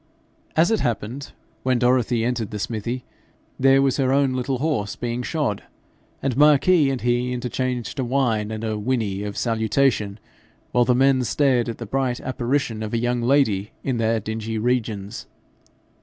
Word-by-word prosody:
As 165 Hz, +6 st, +4 dB
it 220 Hz, -, +2 dB
happened, 120 Hz, +3 st, -3 dB, 0.3 s
when 130 Hz, -1 st, +1 dB
Dorothy 120 Hz, -1 st, +2 dB
entered 120 Hz, -4 st, -1 dB
the 105 Hz, -, -5 dB
smithy, 115 Hz, +4 st, -3 dB, 0.6 s
there 135 Hz, +1 st, +5 dB
was 135 Hz, -2 st, +1 dB
her 130 Hz, -2 st, +2 dB
own 135 Hz, -1 st, +2 dB
little 130 Hz, +1 st, -1 dB
horse 125 Hz, -8 st, -1 dB
being 120 Hz, 0 st, -3 dB
shod, 130 Hz, -7 st, -1 dB, 0.6 s
and 135 Hz, -3 st, 0 dB
Marquis 150 Hz, +2 st, +5 dB
and 135 Hz, -2 st, -2 dB
he 120 Hz, +1 st, +1 dB
interchanged 125 Hz, +1 st, -3 dB
a -, -, +1 dB
whine 120 Hz, -5 st, 0 dB
and 110 Hz, 0 st, -5 dB
a 110 Hz, -1 st, -2 dB
whinny 105 Hz, -4 st, -1 dB
of 105 Hz, 0 st, -5 dB
salutation, 110 Hz, -2 st, +1 dB, 0.5 s
while 120 Hz, 0 st, +3 dB
the 125 Hz, -, +3 dB
men 130 Hz, 0 st, +3 dB
stared 125 Hz, -2 st, +2 dB
at 115 Hz, -, -5 dB
the 115 Hz, -, -6 dB
bright 130 Hz, +2 st, -1 dB
apparition 125 Hz, -3 st, -2 dB
of 110 Hz, +1 st, -3 dB
a -, -, +2 dB
young 120 Hz, +1 st, 0 dB
lady 115 Hz, -6 st, +2 dB
in 130 Hz, -3 st, -1 dB
their 115 Hz, 0 st, +1 dB
dingy 110 Hz, +1 st, -4 dB
regions. 110 Hz, -3 st, -2 dB
120 Hz, 165 wpm, -23 LUFS, 110-135 Hz, 0.6 s, there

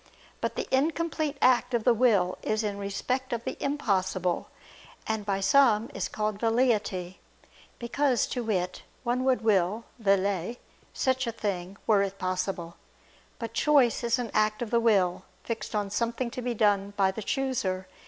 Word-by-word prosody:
But -, -, -2 dB
the -, -, -3 dB
incomplete 310 Hz, 0 st, 0 dB
act 250 Hz, 0 st, +4 dB
of 230 Hz, -, 0 dB
the 245 Hz, -, +5 dB
will 210 Hz, -7 st, +2 dB
is 215 Hz, +1 st, -1 dB
in 205 Hz, -1 st, -3 dB
respect 250 Hz, +7 st, -2 dB
of 235 Hz, -1 st, -2 dB
the -, -, -4 dB
impossible; 190 Hz, -10 st, 0 dB, 0.6 s
and 220 Hz, -2 st, -3 dB
by 195 Hz, -1 st, 0 dB
some 230 Hz, 0 st, +4 dB
is 195 Hz, -, -2 dB
called 215 Hz, -1 st, -2 dB
"velleity," 220 Hz, -6 st, +1 dB, 0.6 s
because, 250 Hz, +1 st, +1 dB
to 245 Hz, -, -2 dB
wit, 185 Hz, -5 st, -1 dB, 0.2 s
one 250 Hz, +1 st, 0 dB
would 260 Hz, -2 st, +2 dB
will 205 Hz, 0 st, +2 dB, 0.2 s
(vellet) 200 Hz, +1 st, +1 dB, 0.3 s
such 260 Hz, -1 st, 0 dB
a -, -, 0 dB
thing, 195 Hz, -4 st, -4 dB
were 210 Hz, -3 st, +4 dB
it 195 Hz, 0 st, -2 dB
possible. 185 Hz, -2 st, -3 dB, 0.6 s
But 230 Hz, -1 st, -6 dB
choice 275 Hz, -6 st, +3 dB
is 235 Hz, -1 st, +2 dB
an 245 Hz, -3 st, -4 dB
act 215 Hz, +1 st, +1 dB
of 225 Hz, -, -7 dB
the 235 Hz, -, +4 dB
will, 195 Hz, -7 st, +2 dB, 0.2 s
fixed 225 Hz, -2 st, -4 dB
on 205 Hz, -1 st, -1 dB
something 235 Hz, +3 st, -1 dB
to 250 Hz, -, -5 dB
be 245 Hz, -1 st, -2 dB
done 205 Hz, -2 st, +2 dB
by 190 Hz, -1 st, +3 dB
the 220 Hz, -, -6 dB
chooser. 205 Hz, -7 st, -1 dB
220 Hz, 165 wpm, -28 LUFS, 195-245 Hz, 0.6 s, the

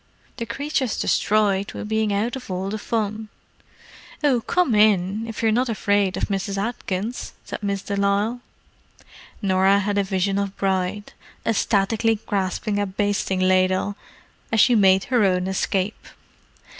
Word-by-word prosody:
"The 230 Hz, -2 st, -4 dB
creature's 275 Hz, 0 st, -2 dB
destroyed 200 Hz, -2 st, +1 dB
with 210 Hz, -, -6 dB
bein' 220 Hz, -1 st, +1 dB
out 215 Hz, +5 st, 0 dB
of 260 Hz, -4 st, -9 dB
all 190 Hz, +1 st, -3 dB
the 215 Hz, -, -3 dB
fun." 215 Hz, -1 st, -2 dB, 0.9 s
"Oh, 265 Hz, -5 st, +3 dB
come 350 Hz, +2 st, +1 dB
in—if 210 Hz, +2 st, +2 dB
you're 220 Hz, -, +4 dB
not 245 Hz, +3 st, +1 dB
afraid 205 Hz, -3 st, +1 dB
of -, -, -3 dB
Mrs. 195 Hz, 0 st, -2 dB
Atkins," 215 Hz, +1 st, -3 dB
said -, -, -6 dB
Miss 200 Hz, -1 st, -2 dB
de 200 Hz, -, -3 dB
Lisle. 200 Hz, +4 st, 0 dB, 1.0 s
Norah 190 Hz, 0 st, +4 dB
had 205 Hz, 0 st, 0 dB
a -, -, +2 dB
vision 195 Hz, +1 st, 0 dB
of 200 Hz, -1 st, -3 dB
Bride, 190 Hz, +1 st, -1 dB, 0.3 s
ecstatically 225 Hz, +1 st, +1 dB
grasping 200 Hz, +1 st, -1 dB
a 205 Hz, -, 0 dB
basting 195 Hz, -1 st, -1 dB
ladle, 185 Hz, +2 st, +2 dB, 0.6 s
as 225 Hz, -, +2 dB
she 245 Hz, -, +6 dB
made 190 Hz, -3 st, +5 dB
her 245 Hz, -4 st, +2 dB
own 180 Hz, -2 st, +2 dB
escape. 190 Hz, +1 st, -1 dB
205 Hz, 145 wpm, -23 LUFS, 195-220 Hz, 1.0 s, she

